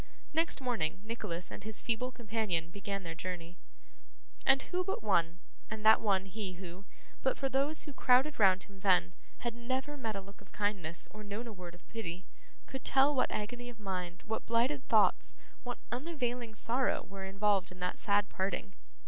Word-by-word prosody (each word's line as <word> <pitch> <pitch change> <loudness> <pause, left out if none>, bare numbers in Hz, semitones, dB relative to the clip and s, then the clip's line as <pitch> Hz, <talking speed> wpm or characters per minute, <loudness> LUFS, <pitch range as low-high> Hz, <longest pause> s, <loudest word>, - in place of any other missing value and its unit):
Next 325 +1 +2
morning 190 -10 0
Nicholas 210 -6 -4
and - - -7
his 220 0 0
feeble 245 +2 0
companion 210 -8 -1
began 200 0 -4
their 165 -1 -4
journey. 175 0 -6 0.9
And 270 0 +6
who 365 0 -1
but 385 -8 -2
one 175 -5 +2 0.3
and 215 0 -5
that 220 - +8
one 195 -3 +2
he 195 -1 -4
who, 180 +1 -9 0.4
but 265 - +2
for 270 - 0
those 275 +4 +2
who 295 - -6
crowded 260 +3 +4
round 190 -2 +6
him 200 -1 -15
then, 180 -2 +4 0.3
had 235 -1 -1
never 260 +5 -2
met 225 -5 -2
a 195 - -3
look 200 +1 -14
of 200 - -18
kindness, 195 -6 -1
or 215 0 -9
known 205 +3 -4
a 230 - -6
word 180 -3 -9
of 175 - -20
pity 185 -5 -5 0.4
could 265 - -6
tell 275 +2 +5
what 255 - +2
agony 245 +3 -3
of 235 -2 -11
mind, 185 -2 -4
what 220 0 -3
blighted 255 +4 +2
thoughts, 215 -2 +4 0.3
what 245 -1 -4
unavailing 245 -4 -2
sorrow, 245 +5 +1
were 195 -1 -6
involved 195 -1 +2
in 185 - -11
that 180 - -1
sad 205 0 +3
parting? 195 0 -2
210 Hz, 180 wpm, -33 LUFS, 190-245 Hz, 0.9 s, that